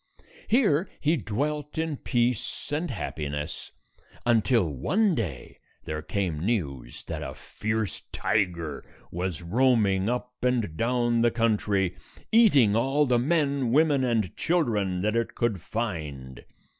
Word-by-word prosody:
Here 205 - +3
he 155 +3 +2
dwelt 150 +5 -3
in 160 -1 -1
peace 120 0 -1
and 155 +4 -1
happi 75 - -4
ness, 75 0 -5 0.5
until 120 -1 +3
one 185 - +1
day 90 - -4 0.2
there 75 0 -4
came 85 -3 -2
news 70 - -2
that 80 -2 -5
a 65 -2 -6
fierce 110 -1 -3
tiger 85 -8 -1 0.3
was 90 -1 -3
roaming 105 -1 +2
up 125 0 -4
and 120 -9 +1
down 120 +2 +1
the 120 - +5
country, 105 -5 +1 0.4
eating 145 - +5
all 135 +6 +2
the 125 -3 +2
men, 140 -2 +1
women, 145 -1 +4
and 115 -8 0
children 105 - 0
that 105 +2 +1
it 115 -1 -1
could 110 -7 0
find. 75 - -5
115 Hz, 130 wpm, -27 LUFS, 90-130 Hz, 0.5 s, the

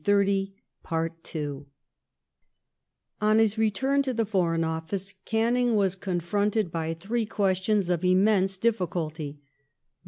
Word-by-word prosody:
I 200 -1 +2 2.7
On 215 +1 +4
his 220 -1 +3
return 265 +6 +2
to 260 -3 -2
the 225 0 +1
Foreign 175 -5 +1
Office 165 +5 -3
Canning 235 +1 +2
was 195 -3 +2
confronted 195 +2 -1
Canning's - - -30
by 165 -1 -1
three 215 +6 -2
questions 195 -1 +1
of 175 0 0
immense 190 +1 +3
difficulty— 165 -8 -2
the. - - -40
195 Hz, 115 wpm, -27 LUFS, 175-220 Hz, 2.7 s, On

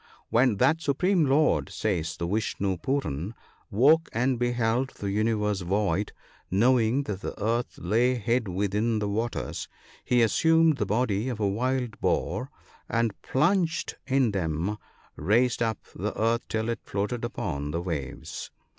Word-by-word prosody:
" - - -35
When 120 -2 +3
that 145 +8 +3
supreme 165 +3 +2
lord," 150 +3 +3
says 85 -6 -2
the 85 - -2
Vishnoo 100 -1 -1
Pooran, 100 - -2 0.2
" - - -33
woke 145 +10 +4
and 125 +1 +1
beheld 120 +1 +1
the 100 -1 -3
universe 105 -1 0
void, 100 +1 0 0.4
knowing 120 +5 +3
that 100 -6 -5
the - - -6
earth 115 +3 -1
lay 120 +7 +2
hid 120 0 0
within 105 +5 0
the 105 -1 -1
waters, 115 +4 -3 0.4
he 125 -1 +3
assumed 160 +6 +4
the 105 - -1
body 110 +1 0
of 120 -4 -4
a 105 - +2
wild 125 +2 -1
boar, - - 0 0.4
and 115 -2 +1
plunging 165 +4 +1
in 130 -4 +3
them 90 +2 -1 0.4
raised 115 +10 +2
up 115 -1 +1 0.2
the - - -4
earth 115 +2 +1
till 110 +1 -1
it 115 -2 -2
floated 105 +4 -3
upon 75 -11 -3
the 80 +3 -2
waves." 80 -7 -5
115 Hz, 150 wpm, -27 LUFS, 100-125 Hz, 0.4 s, woke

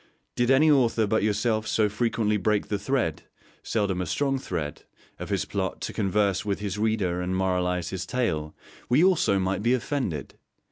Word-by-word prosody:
Did 120 0 +1
any 150 +4 +5
author 120 -5 +3
but 110 +2 +1
yourself 110 +1 0
so 110 -1 +2
frequently 110 0 0
break 105 0 0
the 105 - -1
thread 105 - -1 0.4
(seldom 100 -5 -1
a 90 - -3
strong 135 - 0
thread) 80 - -4 0.4
of - - -6
his - - 0
plot - - -3
to - - -4
converse 100 -1 +1
with 100 -1 -1
his 105 0 -4
reader 105 -5 0
and 90 +1 -2
moralise 90 -2 0
his 95 -1 -5
tale, 80 -12 -1 0.3
we 130 +7 +4
also 180 - +3
might 95 +1 -1
be 120 +4 +3
offended. 120 - -3
105 Hz, 175 wpm, -26 LUFS, 95-120 Hz, 0.4 s, any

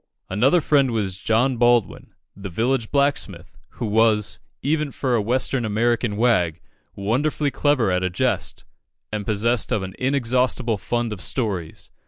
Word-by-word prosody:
Another 130 - +3
friend 140 -3 +3
was 100 -5 -2
John 120 +5 +1
Baldwin, 120 -3 +1 0.2
the 100 0 -7
village 115 +5 0
blacksmith, 140 0 -1 0.2
who 120 - -4
was, 110 -1 +2 0.2
even 150 0 0
for 130 -2 -1
a 115 - +2
Western 125 +3 0
American 115 0 0
wag, 90 -9 +2 0.4
wonderfully 140 +8 0
clever 135 -10 +2
at 90 0 +1
a 95 - 0
jest, 105 +3 -1 0.5
and 105 -2 -4
possessed 110 +2 0
of 100 - 0
an 95 0 -6
inexhaustible 125 -3 0
fund 120 -1 -2
of 95 - -8
stories. 95 -8 -3
115 Hz, 145 wpm, -22 LUFS, 105-130 Hz, 0.5 s, Another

